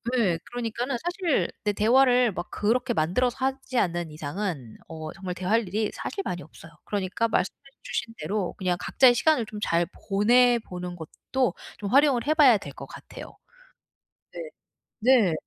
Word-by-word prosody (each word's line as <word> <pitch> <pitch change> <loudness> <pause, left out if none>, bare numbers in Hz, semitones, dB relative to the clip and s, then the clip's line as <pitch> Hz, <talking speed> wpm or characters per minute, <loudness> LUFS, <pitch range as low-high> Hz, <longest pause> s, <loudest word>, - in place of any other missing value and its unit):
네 195 -9 +2
그러니까는 240 +2 -3
사실 350 -2 0
네 210 - +2
대화를 245 +2 +4
막 175 -1 -6
그렇게 240 +4 0
만들어서 235 +9 +1
하지 265 -1 -3
않는 175 -6 0
이상은 150 - -5
어 160 -1 -7
정말 185 -2 -6
대화할 205 +4 0
일이 210 +3 -1
사실 400 - -4
많이 175 - -4
없어요. 160 +2 -14
그러니까 200 +2 -1
말씀해 200 -4 -1 0.3
주신 225 - -4
대로 185 +4 -2
그냥 180 -3 0
각자의 255 -2 +5
시간을 255 -1 +2
좀 210 -1 -7
잘 170 -3 +1 0.2
보내 240 +5 +4
보는 180 -1 -6
것도 240 +10 -2 0.3
좀 205 -2 -4
활용을 275 -1 +4
해 305 - +4
봐야 280 -8 +6
될 - - -9
것 - - -9
같아요. - - -11 1.0
네. - - -7 0.6
네. 230 -7 +4
215 Hz, 320 characters per minute, -26 LUFS, 180-250 Hz, 1.0 s, 봐야